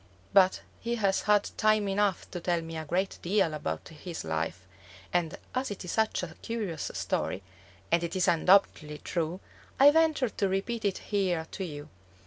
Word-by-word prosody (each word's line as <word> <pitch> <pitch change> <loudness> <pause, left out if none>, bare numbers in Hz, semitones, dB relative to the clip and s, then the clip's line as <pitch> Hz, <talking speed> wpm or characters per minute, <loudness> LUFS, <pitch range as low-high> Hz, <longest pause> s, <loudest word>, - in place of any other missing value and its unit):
But 190 -1 +5 0.2
he 235 +1 -2
has 200 -4 +1
had 210 -1 +2
time 215 -1 +3
enough 195 -1 +1
to 175 - -4
tell 170 -1 0
me 165 0 -7
a 160 0 -4
great 185 +5 -1
deal 180 -3 +2
about 80 - -4
his 165 +2 -7
life, 80 +3 -3 0.5
and 175 -3 0 0.2
as 255 +1 -1
it 200 -2 -6
is 180 - -4
such 220 -4 +1
a 165 -3 -5
curious 210 -9 -3
story, 95 - -2 0.5
and 170 0 +3
is 180 +2 0
undoubtedly 170 -3 +3
true, 170 +3 -3 0.4
I 280 +2 +9
venture 315 -5 +3
to 200 -2 -1
repeat 210 +4 -2
it 200 - +1 0.2
here 180 -5 +1
to 195 - -4
you. 150 -3 -7
185 Hz, 170 wpm, -29 LUFS, 165-205 Hz, 0.5 s, I